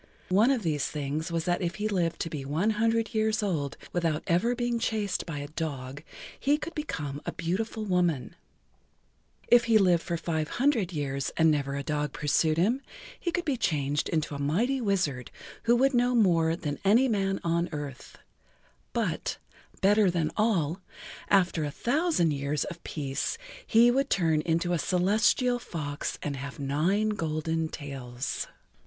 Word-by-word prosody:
One 205 Hz, +7 st, +5 dB
of 260 Hz, -5 st, +1 dB
these 150 Hz, -5 st, 0 dB
things 150 Hz, +3 st, -3 dB
was 165 Hz, -1 st, -1 dB
that 175 Hz, -1 st, 0 dB
if 175 Hz, -1 st, -2 dB
he 215 Hz, 0 st, -1 dB
lived 175 Hz, -5 st, 0 dB
to 165 Hz, -, -2 dB
be 145 Hz, -3 st, -4 dB
one 160 Hz, +10 st, +1 dB
hundred 225 Hz, +1 st, +1 dB
years 220 Hz, 0 st, +1 dB
old 155 Hz, -9 st, -1 dB, 0.2 s
without 165 Hz, -3 st, 0 dB
ever 195 Hz, +9 st, +2 dB
being 240 Hz, -1 st, -1 dB
chased 210 Hz, -5 st, -1 dB
by 160 Hz, -3 st, -4 dB
a 145 Hz, 0 st, -5 dB
dog, 145 Hz, -4 st, -5 dB, 0.4 s
he 290 Hz, +2 st, +3 dB
could 315 Hz, +3 st, -6 dB
become 150 Hz, -, -4 dB
a -, -, 0 dB
beautiful 215 Hz, +6 st, -2 dB
woman; 175 Hz, -9 st, 0 dB, 1.1 s
if 240 Hz, 0 st, +6 dB
he 230 Hz, -2 st, +5 dB
lived 180 Hz, -5 st, +4 dB
for 170 Hz, -1 st, -3 dB
five 160 Hz, -2 st, -2 dB
hundred 245 Hz, -8 st, +2 dB
years 140 Hz, -4 st, -2 dB
and 160 Hz, -1 st, +5 dB
never 140 Hz, -2 st, -1 dB
a 140 Hz, -, -3 dB
dog 150 Hz, -1 st, -2 dB
pursued 155 Hz, +2 st, +1 dB
him, 225 Hz, +10 st, +2 dB, 0.4 s
he 345 Hz, -, -2 dB
could 350 Hz, +1 st, -2 dB
be 285 Hz, -5 st, 0 dB
changed 145 Hz, -, 0 dB
into 155 Hz, -2 st, -1 dB
a 140 Hz, -, -5 dB
mighty 220 Hz, -, +1 dB
wizard 175 Hz, -, 0 dB, 0.4 s
who 235 Hz, +1 st, +5 dB
would 270 Hz, +3 st, +3 dB
know 245 Hz, 0 st, +3 dB
more 165 Hz, -7 st, +3 dB
than 145 Hz, -4 st, -4 dB
any 225 Hz, +7 st, +5 dB
man 195 Hz, -4 st, 0 dB
on 170 Hz, +1 st, 0 dB
earth; 145 Hz, -4 st, -7 dB, 0.8 s
but, -, -, -1 dB, 0.4 s
better 205 Hz, 0 st, +5 dB
than 170 Hz, -3 st, 0 dB
all, 190 Hz, -6 st, +1 dB, 0.5 s
after 180 Hz, -5 st, +3 dB
a 145 Hz, -, -1 dB
thousand 245 Hz, -, +1 dB
years 140 Hz, +1 st, -1 dB
of 170 Hz, -2 st, -8 dB
peace 140 Hz, -3 st, -3 dB, 0.3 s
he[Pg 230 Hz, +2 st, +6 dB
6] -, -, +3 dB
would 275 Hz, +1 st, +1 dB
turn 160 Hz, -5 st, +2 dB
into 170 Hz, +2 st, 0 dB
a 170 Hz, -, +1 dB
celestial 210 Hz, -, +2 dB
fox 150 Hz, -11 st, -4 dB
and 140 Hz, -2 st, -3 dB
have 140 Hz, +1 st, -6 dB
nine 160 Hz, +10 st, +1 dB
golden 160 Hz, -4 st, -1 dB
tails. 135 Hz, -3 st, -5 dB
170 Hz, 170 wpm, -28 LUFS, 150-220 Hz, 1.1 s, if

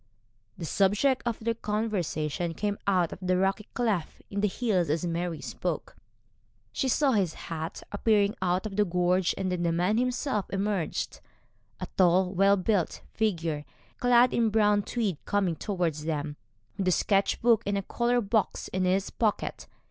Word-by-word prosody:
The 165 Hz, -, -5 dB
subject 205 Hz, -, +2 dB
of 230 Hz, -, -1 dB
their 230 Hz, +1 st, -1 dB
conversation 180 Hz, -7 st, -2 dB
came 205 Hz, +2 st, -2 dB
out 180 Hz, -4 st, +2 dB
of -, -, -10 dB
the 185 Hz, 0 st, +1 dB
rocky 195 Hz, +2 st, 0 dB
cleft 215 Hz, -9 st, -1 dB
in 200 Hz, 0 st, -1 dB
the 210 Hz, -, +3 dB
hills 190 Hz, -6 st, 0 dB
as 160 Hz, +4 st, 0 dB
Mary 170 Hz, -1 st, -2 dB
spoke. 115 Hz, -7 st, -4 dB, 0.8 s
She 270 Hz, -, 0 dB
saw 270 Hz, +2 st, +3 dB
his 195 Hz, -8 st, +1 dB
hat 160 Hz, 0 st, -6 dB
appearing 205 Hz, -1 st, +2 dB
out 185 Hz, +2 st, +1 dB
of 205 Hz, -2 st, -5 dB
the 210 Hz, -, +5 dB
gorge, 180 Hz, 0 st, +1 dB
and 190 Hz, -1 st, -1 dB
then 180 Hz, -1 st, -1 dB
the 170 Hz, -1 st, +1 dB
man 180 Hz, +7 st, +1 dB
himself 250 Hz, -3 st, -1 dB
emerged, 195 Hz, -3 st, -2 dB, 0.6 s
a -, -, -3 dB
tall 185 Hz, +1 st, +4 dB
well 195 Hz, +2 st, +4 dB
built 185 Hz, -2 st, 0 dB
figure, 170 Hz, -8 st, -1 dB, 0.4 s
clad 245 Hz, 0 st, +5 dB
in 230 Hz, -1 st, +2 dB
brown 210 Hz, -1 st, +3 dB
tweed, 200 Hz, -7 st, -2 dB
coming 195 Hz, -5 st, +1 dB
towards 170 Hz, -6 st, -2 dB
them, 150 Hz, -2 st, -2 dB, 0.4 s
with 185 Hz, -1 st, +2 dB
sketch 195 Hz, -1 st, +1 dB
book 230 Hz, -2 st, +5 dB
and 200 Hz, -1 st, -1 dB
colour 240 Hz, 0 st, +1 dB
box 210 Hz, -1 st, 0 dB
in 185 Hz, 0 st, -1 dB
his 190 Hz, +2 st, +1 dB
pocket. 215 Hz, -3 st, -1 dB
195 Hz, 160 wpm, -28 LUFS, 175-215 Hz, 0.8 s, the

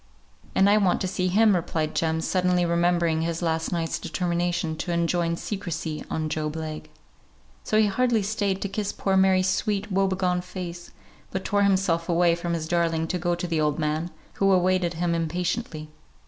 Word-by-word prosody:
"And 190 Hz, +1 st, +5 dB
I 205 Hz, +1 st, +5 dB
want 195 Hz, -4 st, +2 dB
to 190 Hz, -, 0 dB
see 185 Hz, 0 st, -1 dB
him," 210 Hz, +2 st, +4 dB
replied 160 Hz, -2 st, -1 dB
Jem, 160 Hz, 0 st, 0 dB
suddenly 180 Hz, 0 st, +1 dB
remembering 170 Hz, -1 st, +2 dB
his 165 Hz, +1 st, -2 dB
last 160 Hz, -1 st, -1 dB
night's 165 Hz, -2 st, -1 dB
determination 175 Hz, -1 st, -1 dB
to 175 Hz, -, -3 dB
enjoin 170 Hz, 0 st, +1 dB
secrecy 170 Hz, -5 st, -4 dB
on 155 Hz, -1 st, -2 dB
Job 155 Hz, 0 st, -3 dB
Legh. 155 Hz, -1 st, -6 dB, 0.7 s
So 215 Hz, -, +1 dB
he 215 Hz, -, +5 dB
hardly 225 Hz, +1 st, +1 dB
stayed 200 Hz, -2 st, -1 dB
to -, -, -1 dB
kiss 200 Hz, +1 st, -3 dB
poor 195 Hz, -1 st, -1 dB
Mary's 190 Hz, -1 st, +4 dB
sweet 200 Hz, +2 st, -1 dB
woe 195 Hz, +1 st, +2 dB
begone 185 Hz, -1 st, 0 dB
face, 180 Hz, -1 st, -7 dB, 0.4 s
but 190 Hz, -, -4 dB
tore 205 Hz, 0 st, +1 dB
himself 190 Hz, -4 st, +2 dB
away 170 Hz, 0 st, +4 dB
from 170 Hz, 0 st, -2 dB
his 160 Hz, -1 st, -3 dB
darling 165 Hz, -1 st, +1 dB
to 180 Hz, -, -1 dB
go 175 Hz, +1 st, 0 dB
to 175 Hz, -, -4 dB
the 165 Hz, -3 st, 0 dB
old 150 Hz, -1 st, +1 dB
man, 155 Hz, +2 st, -1 dB, 0.3 s
who 195 Hz, 0 st, +5 dB
awaited 185 Hz, -2 st, +2 dB
him 170 Hz, +1 st, 0 dB
impatiently. 165 Hz, 0 st, -2 dB
175 Hz, 180 wpm, -25 LUFS, 165-190 Hz, 0.7 s, And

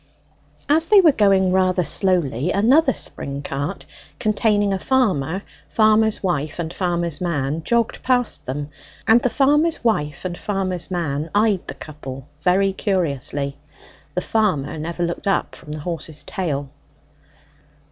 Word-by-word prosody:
As 320 Hz, +3 st, +3 dB
they 415 Hz, +1 st, +7 dB
were 340 Hz, -5 st, +6 dB
going 195 Hz, -6 st, +3 dB
rather 185 Hz, -1 st, +2 dB
slowly, 160 Hz, -, +1 dB
another 265 Hz, +9 st, +4 dB
spring 140 Hz, -, -4 dB
cart, 145 Hz, +8 st, -4 dB, 0.3 s
containing 210 Hz, -2 st, +1 dB
a 190 Hz, -, -1 dB
farmer, 190 Hz, -, +1 dB, 0.3 s
farmer's 215 Hz, -1 st, +3 dB
wife, 155 Hz, -5 st, -1 dB
and 170 Hz, -1 st, -4 dB
farmer's 175 Hz, -4 st, -2 dB
man, 155 Hz, -3 st, -1 dB
jogged 235 Hz, +3 st, 0 dB
past 250 Hz, -2 st, +1 dB
them; 145 Hz, +3 st, -4 dB, 0.4 s
and 225 Hz, +2 st, +6 dB
the 250 Hz, -, +1 dB
farmer's 295 Hz, +5 st, +2 dB
wife 150 Hz, -10 st, 0 dB
and 180 Hz, -1 st, -3 dB
farmer's 185 Hz, -4 st, -2 dB
man 160 Hz, -4 st, -2 dB
eyed 210 Hz, -3 st, +2 dB
the -, -, -6 dB
couple 135 Hz, -3 st, -9 dB
very 190 Hz, +3 st, +3 dB
curiously. 145 Hz, -, -2 dB, 0.6 s
The 180 Hz, -, 0 dB
farmer 180 Hz, -11 st, 0 dB
never 170 Hz, +3 st, -3 dB
looked 170 Hz, +3 st, -3 dB
up 195 Hz, -, 0 dB
from 150 Hz, -, -11 dB
the 150 Hz, 0 st, -5 dB
horse's 160 Hz, -2 st, -5 dB
tail. 145 Hz, -8 st, -3 dB
180 Hz, 135 wpm, -21 LUFS, 150-215 Hz, 0.6 s, they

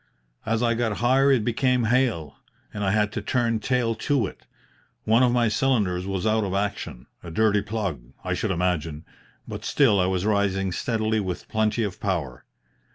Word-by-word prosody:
As 115 Hz, +1 st, +1 dB
I 115 Hz, -1 st, +3 dB
got 115 Hz, -3 st, -1 dB
higher 135 Hz, +4 st, +3 dB
it 120 Hz, -6 st, +2 dB
became 125 Hz, +1 st, +1 dB
hail, 115 Hz, -, 0 dB, 0.4 s
and 105 Hz, -, -4 dB
I 95 Hz, -, +1 dB
had 105 Hz, +1 st, +1 dB
to 105 Hz, -, -4 dB
turn 115 Hz, +1 st, 0 dB
tail 120 Hz, 0 st, 0 dB
to 125 Hz, +1 st, 0 dB
it. -, -, -10 dB, 0.6 s
One 115 Hz, +3 st, +3 dB
of 125 Hz, -1 st, +4 dB
my 120 Hz, -1 st, +2 dB
cylinders 105 Hz, -6 st, +1 dB
was 95 Hz, 0 st, -2 dB
out 110 Hz, 0 st, +2 dB
of 95 Hz, -1 st, -2 dB
action 100 Hz, -11 st, -3 dB, 0.2 s
a -, -, -9 dB
dirty 105 Hz, +4 st, +2 dB
plug, 100 Hz, -, -3 dB, 0.2 s
I -, -, -1 dB
should -, -, -2 dB
imagine, 85 Hz, -4 st, -1 dB, 0.4 s
but -, -, -6 dB
still 115 Hz, -9 st, +3 dB
I 90 Hz, -, +2 dB
was 95 Hz, 0 st, -1 dB
rising 100 Hz, -2 st, +1 dB
steadily 110 Hz, +1 st, 0 dB
with 95 Hz, -3 st, -4 dB
plenty 110 Hz, +1 st, 0 dB
of 100 Hz, -4 st, -4 dB
power. 80 Hz, -, -3 dB
105 Hz, 180 wpm, -25 LUFS, 95-115 Hz, 0.6 s, of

